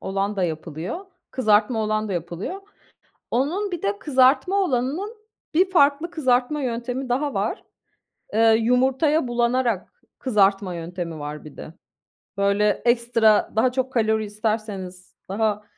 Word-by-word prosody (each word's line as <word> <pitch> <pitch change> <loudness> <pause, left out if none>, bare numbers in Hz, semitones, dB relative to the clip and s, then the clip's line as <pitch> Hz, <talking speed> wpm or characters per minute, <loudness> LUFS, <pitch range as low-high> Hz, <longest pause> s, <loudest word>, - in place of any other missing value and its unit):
olan 195 +2 -2
da 185 - +1
yapılıyor, 165 - -5 0.2
kızartma 220 -1 +2
olan 215 0 -1
da - - -3
yapılıyor. 175 - -4 0.7
Onun 350 +11 0
bir 350 - -4
de 200 0 -1
kızartma 270 - +3
olanının 355 - -1 0.4
bir 370 +4 +3
farklı 300 0 +3
kızartma 260 0 +1
yöntemi 250 +1 -3
daha 275 +4 0
var. - - -2 0.7
Eee, 225 +1 +5
yumurtaya 260 +5 +2
bulanarak 240 - -1 0.2
kızartma 200 -6 +2
yöntemi 170 -1 -6
var 150 +1 -6
bir 150 - -12
de. 155 - -9 0.6
Böyle 200 +1 +2 0.2
ekstra 235 -3 +3
daha 245 +3 +3
çok 260 0 -2
kalori 220 -2 +1
isterseniz, 205 -4 -4
daha 210 +1 0
230 Hz, 125 wpm, -23 LUFS, 200-265 Hz, 0.7 s, Eee